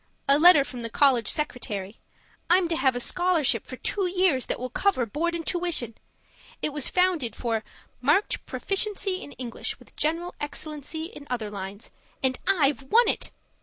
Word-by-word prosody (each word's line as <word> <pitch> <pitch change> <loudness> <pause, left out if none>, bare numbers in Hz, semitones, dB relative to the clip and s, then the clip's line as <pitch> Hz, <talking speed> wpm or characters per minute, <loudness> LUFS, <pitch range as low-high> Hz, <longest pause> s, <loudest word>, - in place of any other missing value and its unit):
A 280 +1 +5
letter 330 -3 +8
from 255 -2 -8
the 230 -1 -4
college 255 -1 +4
secretary. 215 -9 -3 0.5
I'm 355 0 +5
to 335 - 0
have 265 -5 +2
a - - -1
scholarship 350 +1 +1
for - - -7
two 395 -3 -1
years 360 -8 +2
that - - -2
will 255 0 -5
cover 370 -6 +1
board 330 +10 -2
and 330 -1 -5
tuition. 345 - 0 0.7
It 300 - -2
was 295 -3 +3
founded 360 -10 +1
for 225 -2 -2 0.4
'marked 400 - +2
proficiency 390 -1 -1
in 285 - -9
English 245 -3 -4
with - - -19
general 335 +3 -1
excellency 305 +1 -4
in 295 -4 -11
other 225 -4 -3
lines.' 200 +2 -7 0.3
And 260 -1 +1
I've 300 -8 +3
won 450 - +4
it! - - +1
295 Hz, 165 wpm, -26 LUFS, 250-355 Hz, 0.7 s, letter